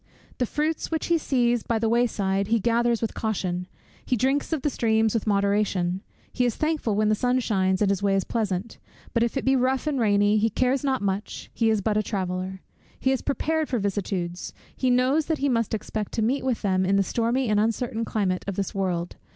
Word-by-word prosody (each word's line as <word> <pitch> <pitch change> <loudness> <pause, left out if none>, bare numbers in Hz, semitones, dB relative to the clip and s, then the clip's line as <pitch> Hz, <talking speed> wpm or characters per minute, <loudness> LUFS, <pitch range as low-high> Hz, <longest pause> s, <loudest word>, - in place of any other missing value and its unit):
The 250 - +1
fruits 310 +5 -1
which 320 -1 -1
he 335 -1 +2
sees 240 -5 +1
by 230 - -1
the 225 +1 0
way 240 +2 +3
side 195 -2 -1
he 230 +1 +2
gathers 235 +1 +1
with 225 - -1
caution; 180 -5 -2 0.4
he 250 - 0
drinks 270 +6 0
of 315 -5 -1
the 295 - +2
streams 220 -2 +2
with 225 -2 -1
moderation; 200 -3 +1 0.3
he 250 - +1
is 240 -3 +1
thankful 305 -9 0
when 215 +1 +2
the - - +4
sun 250 +3 +1
shines, 190 -4 +1
and 200 - +3
his 195 -1 -1
way 200 -1 +2
is 195 - +1
pleasant; 215 -2 -3 0.3
but 235 - +2
if 235 +3 0
it - - -2
be 265 0 +4
rough 260 +2 +1
and 295 -3 0
rainy, 205 -1 +3
he 225 +2 +2
cares 255 +5 +1
not 265 -5 0
much, 200 +1 -3
he 225 -1 +2
is 215 -2 +2
but 210 +1 0
a - - +3
traveller. 185 -2 -3 0.4
He 265 - +2
is 265 - 0
prepared 310 +2 -1
for 250 - 0
vicissitudes; 190 -4 -3 0.2
he 260 - 0
knows 255 +5 +2
that 320 -1 0
he 280 0 0
must 230 -3 +1
expect 215 -1 -4
to 225 - 0
meet 260 +5 0
with 255 -4 -1
them 190 -2 +2
in 190 +1 +2
the 200 - +4
stormy 235 +6 0
and 210 -1 +2
uncertain 225 +1 0
climate 195 -5 -1
of 200 - -2
this 195 -1 -2
world. 180 -3 -2
220 Hz, 225 wpm, -25 LUFS, 200-255 Hz, 0.4 s, the